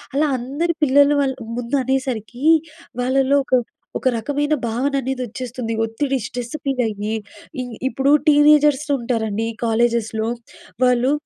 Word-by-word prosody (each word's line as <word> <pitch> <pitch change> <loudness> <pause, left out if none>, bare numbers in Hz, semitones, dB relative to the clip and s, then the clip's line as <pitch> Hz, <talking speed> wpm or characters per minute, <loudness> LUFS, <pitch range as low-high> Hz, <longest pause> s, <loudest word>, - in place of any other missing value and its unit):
అలా 300 +2 +3
అందరి 290 +8 -2
పిల్లలు 285 +2 +5
వాళ్ళ 265 -1 0 0.3
ముందు 245 +4 -1
అనేసరికి 255 -1 -2 0.6
వాళ్ళలో 270 +2 +2
ఒక - - -23 0.5
ఒక - - -2
రకమైన 290 +6 -1
భావన 255 +5 -1
అనేది 265 0 -3
వచ్చేస్తుంది. 240 0 -5
ఒత్తిడి 265 +5 -1
స్ట్రెస్ 245 +3 -6
ఫీల్ 270 -3 0
అయ్యి, 210 0 -3 0.5
ఇ - - -3 0.3
ఇప్పుడు 270 +1 +1 0.2
టీనేజర్స్ 295 -1 +5
ఉంటారండి 225 -2 -1 0.2
కాలేజెస్‍లో 225 -1 +1 0.6
వాళ్ళు 250 +2 +3
260 Hz, 125 wpm, -20 LUFS, 230-280 Hz, 0.6 s, పిల్లలు